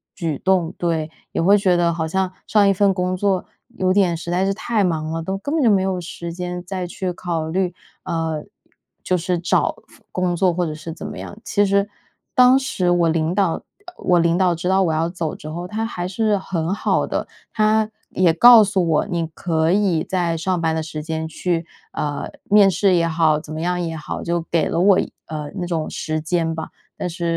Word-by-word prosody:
举 160 -6 -2
动， 185 -3 +1
对。 160 -2 -1 0.2
也 - - 0
会 200 +5 +5
觉 190 -3 +2
得 170 -1 +2
好 160 -1 -2
像 190 +2 -1 0.2
上 210 -2 +4
一 195 - +5
份 200 +1 +3
工 180 0 -1
作 190 0 0 0.3
有 185 0 +2
点 190 -4 +3
实 170 +1 -6
在 185 +2 +1
是 195 - +1
太 215 +1 0
忙 160 -3 -1
了， 165 0 -2
都 190 +3 -2
根 285 +9 -4
本 315 - +2
就 235 - +5
没 200 -3 +4
有 185 -2 -1
时 170 0 -7
间 180 0 -5
再 185 -1 -4
去 180 0 -4
考 170 -3 -3
虑， 180 0 0 0.3
呃， 165 -3 -2 0.6
就 185 - +1
是 180 +1 -1
找 175 - +1
份 - - -21
工 180 -1 0
作 180 0 +2
或 175 +1 0
者 155 - -3
是 155 +2 -7
怎 160 - -8
么 - - -7
样。 205 - -8
其 205 0 +2
实， 200 +1 +2 0.5
当 255 +1 +7
时 185 -9 -1
我 175 -2 +3
领 160 +1 0
导 190 -5 +2
呃， - - -6 0.3
我 180 -1 +2
领 170 +1 +2
导 185 -2 +3
知 170 +2 -4
道 190 +1 +3
我 165 - +1
要 160 +1 +1
走 170 -3 -4
之 155 - -10
后， 175 +3 -5
他 220 +4 -2
还 180 -6 -4
是 210 +2 +1
很 175 -2 -2
好 - - +1
的， - - -2 0.3
他 215 0 +2 0.2
也 175 -3 +3
告 235 +5 +9
诉 195 -3 +1
我， 155 - +2
你 170 -2 -2
可 160 0 0
以 190 -5 +2
在 175 -3 -1
上 180 +2 -1
班 160 -1 +1
的 160 - -1
时 155 0 -6
间 160 0 -3
去 165 +1 -2 0.3
呃， 145 -1 -3 0.2
面 205 -1 +7
试 190 -1 +2
也 170 -1 +2
好， 160 -2 +2
怎 155 0 -9
么 155 - -4
样 180 +1 0
也 165 -2 -3
好， 150 - -5
就 170 0 -1
给 165 -3 +2
了 - - -1
我 195 0 +5
一 - - -3
呃， 150 -2 -5
那 180 -3 -3
种 165 -3 -2
时 155 0 -3
间 165 +1 -1
吧。 160 - -5 0.3
但 180 - -3
是 170 +1 -8
175 Hz, 240 characters per minute, -21 LUFS, 165-190 Hz, 0.6 s, 告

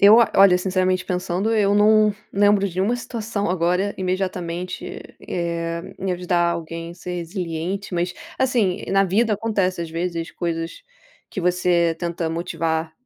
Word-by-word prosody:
Eu, 205 +3 +9 0.2
olha, 190 -2 +7
sinceramente 185 -1 +1
pensando, 180 +4 -1
eu 200 -2 +3
não 215 0 +5 0.2
lembro 205 0 +4
de 175 - -11
nenhuma 210 +6 +1
situação 220 -4 -3
agora, 180 +3 +1
imediatamente, 185 -1 -3
e, - - -7 0.3
eh, 170 -1 -3
em 190 0 -2
ajudar 175 -1 +1
alguém, 165 0 -5
ser 180 0 -6
resiliente, 175 +2 -4
mas, 175 +1 0 0.3
assim, 220 -7 +1
na 195 0 +4
vida 210 +4 +2
acontece 195 -4 0
às 165 - -3
vezes 165 0 -3
coisas, 165 - -3 0.5
que 190 - -4
você 175 -1 +2
tenta 170 -1 -2
motivar 165 -1 -2
180 Hz, 140 wpm, -22 LUFS, 170-200 Hz, 0.5 s, Eu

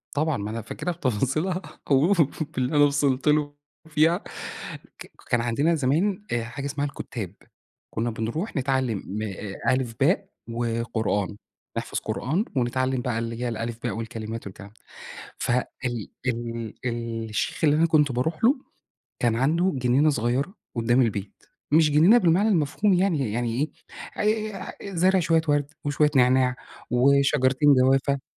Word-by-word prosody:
طبعًا. 155 0 +1
ما 105 +1 -4
أنا 115 +1 -4
فاكرها 180 - -4
بتفاصيلها 155 - -1 0.3
أو 145 +8 +5 0.4
باللي 130 +3 0
أنا 145 - +6
وصلت 140 -1 +1
له 150 -1 +2 0.3
فيها، 160 +3 +3 0.8
ك - - -11 0.2
كان 120 - +2
عندنا 140 +8 +1
زمان 165 +8 +1
آآ 120 -1 0
حاجة 130 +4 -6
اسمها 140 0 -2
الكُتّاب. 110 -8 -6 0.6
كُنّا 115 +2 -1
بنروح 115 - -3
نتعلّم 130 -4 0
م 105 +3 -4
أ 100 +2 -2
ألِف، 125 -3 -2
باء - - +2 0.2
وقرآن، 115 -3 -1 0.4
نحفظ - - -2
قرآن 165 - -1
ونتعلّم 130 +1 0
بقى 120 -2 -1
اللي 115 0 -4
هي 125 - 0
الألِف 115 0 -4
باء 120 - -1
والكلمات 110 0 -5
والكلام 100 +1 -10
ده. - - -25 0.7
فال 125 +1 +1 0.2
ال 120 -4 -3 0.8
ال 115 -2 -3
الشيخ 105 - -2
اللي 150 -1 +5
أنا 160 +2 +4
كنت 150 -3 +3
باروح 155 - -2
له، 255 +5 +6 0.7
كان 115 -2 +2
عنده 165 +8 +2
جنينة 130 +4 +3
صغيرة 135 - -1 0.2
قُدّام 120 +2 +3
البيت، 100 -4 -3 0.3
مش 155 -1 +5
جنينة 165 +11 +6
بالمعنى 185 +1 +3
المفهوم 185 +2 +2
يعني، 165 - +1
يعني 120 +5 -1 0.5
إيه 215 0 0 0.4
آآ - - -8
زارع 185 +2 +4
شوية 165 -1 +3
وَرْد 145 -1 +2 0.2
وشوية 145 +1 +2
نعناع 130 0 +4 0.3
وشجرتين 140 +2 +4
جوافة. 135 +1 +3
130 Hz, 145 wpm, -25 LUFS, 115-155 Hz, 0.8 s, أنا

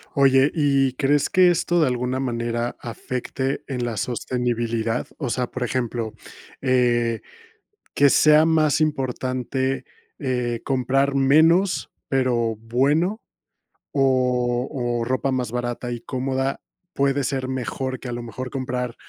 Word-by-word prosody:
Oye, 135 0 +5
¿y 140 -4 +2
crees 140 +2 +1
que 185 -2 +5
esto 175 +1 +1
de 155 - +4
alguna 125 +1 -1
manera 120 -2 -2
afecte 125 +3 -4
en 125 -3 -2
la 120 -2 -3
sostenibilidad? 120 0 -1
O 135 -5 -2
sea, 125 +1 0
por 130 - -6
ejemplo, 120 -2 -2 0.5
eh, 120 -3 +2 0.7
¿que 140 0 +5
sea 155 +2 +6
más 155 -2 +3
importante, 130 -2 -1 0.3
eh, 125 -4 -2
comprar 135 +1 +1
menos, 160 +8 +3 0.2
pero 120 -4 +1
bueno, 145 - +1 0.7
o 125 -2 +1
o - - 0
ropa 130 +3 0
más 125 -3 -2
barata 120 0 -3
y 120 - -4
cómoda 130 +2 -2 0.3
puede 140 0 +1
ser 130 -1 -2
mejor 130 0 -3
que - - -8
a - - -4
lo 120 0 -5
mejor 125 +3 -6
comprar 125 -2 -3
130 Hz, 130 wpm, -23 LUFS, 120-135 Hz, 0.7 s, sea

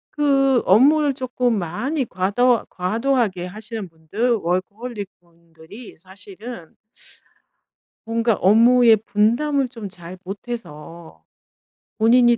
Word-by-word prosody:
그 275 -3 +3
업무를 285 +8 +4
쪼끔 250 -2 -1
많이 255 - -2
과도 215 +6 +1
과도하게 215 -1 -1
하시는 215 0 -7
분들 180 +10 -2
워커홀릭 200 +4 -3
분들이 170 +5 -15
사실은 195 +2 -11 1.3
뭔가 230 0 +1
업무의 230 +4 +5
분담을 240 +7 0
좀 230 -4 -8
잘 175 0 -11
못해서 170 - -9 0.7
본인이 240 +1 +4
220 Hz, 220 characters per minute, -21 LUFS, 185-245 Hz, 1.3 s, 업무의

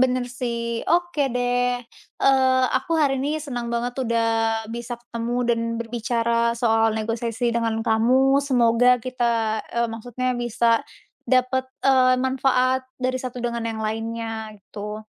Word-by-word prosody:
Bener 255 -1 +2
sih. 235 -2 -3
Oke 345 -2 +1
deh, 245 0 +1 0.4
eee, 260 -1 +4
aku 265 +6 -3
hari 270 -3 +2
ini 295 +3 -1
senang 245 -5 -5
banget 240 +1 -1
udah 230 0 +1 0.5
bisa 240 +1 -5
ketemu 235 0 -4
dan 230 -1 +2 0.2
berbicara 235 0 0
soal 225 -1 +2
negosiasi 230 +1 -1
dengan 230 -1 0
kamu. 260 +5 +3
Semoga 250 -2 +4
kita, 230 -3 0
eee, 235 0 +2
maksudnya 245 +3 -3
bisa 235 -1 +2 0.5
dapet, 260 0 +2 0.2
eee, 255 -1 +5
manfaat 260 0 +1
dari 255 0 -1
satu 255 -1 -6
dengan 235 -1 -2
yang 220 -1 -4
lainnya 225 0 -4
gitu. 210 +2 -8
240 Hz, 130 wpm, -23 LUFS, 230-255 Hz, 0.5 s, eee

